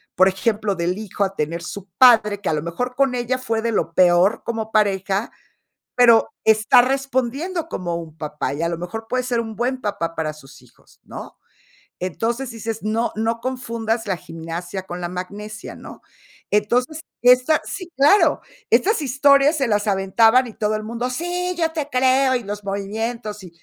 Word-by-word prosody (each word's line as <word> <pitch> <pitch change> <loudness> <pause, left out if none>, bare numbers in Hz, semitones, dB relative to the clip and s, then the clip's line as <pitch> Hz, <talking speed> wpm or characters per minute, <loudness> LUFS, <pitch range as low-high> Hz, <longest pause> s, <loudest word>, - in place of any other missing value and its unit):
por 185 - +5
ejemplo, 205 +1 0
del 175 +2 -1
hijo 205 -1 -3
a 195 0 -2
tener 165 +3 -2
su 200 -1 -8
padre, 215 -5 +6
que 195 - -2
a - - +1
lo 150 -1 -2
mejor 245 +10 -4
con 270 -1 +2
ella 250 +1 -1
fue 225 -3 -2
de 230 0 -1
lo 165 - -1
peor 180 +4 +4
como 220 -1 -4
pareja, 200 0 +1 0.6
pero 235 -2 +5 0.2
está 220 +3 +5
respondiendo 275 +6 -1
como 175 - -4
un 160 -2 -8
papá, 150 -3 -4
y 145 - -4
a 170 - 0
lo 170 - -3
mejor 200 +6 -6
puede 255 0 0
ser 245 -2 0
un 220 -1 -7
buen 255 +2 -1
papá 170 -5 -3
para 155 -1 -2
sus 135 -3 -15
hijos, - - -24
¿no? - - -10 0.6
Entonces 230 +8 -2
dices: 225 -1 -5
"No 225 +2 0
no 225 +2 -1
confundas 230 -3 -3
la 190 -3 -1
gimnasia 170 +2 -6
con 180 -1 -7
la 175 - -2
magnesia", 205 +4 -7
¿no? - - -12 0.5
Entonces, 245 +9 +1 0.2
esta 250 +5 +5
sí, 365 -3 -6
claro. 295 +9 +4 0.3
Estas 425 -3 +3
historias 280 +2 +4
se 270 - +1
las 210 -1 +1
aventaban 225 +6 +3
y 225 - -10
todo 215 0 -1
el 215 - -4
mundo, 235 +3 -3
sí, 355 +5 -2
yo 325 -1 +1
te 305 -3 -4
creo, 260 0 +3
y 245 - -2
los 205 0 -6
movimientos, 210 +2 -4
y 180 - -10
225 Hz, 180 wpm, -21 LUFS, 190-255 Hz, 0.6 s, padre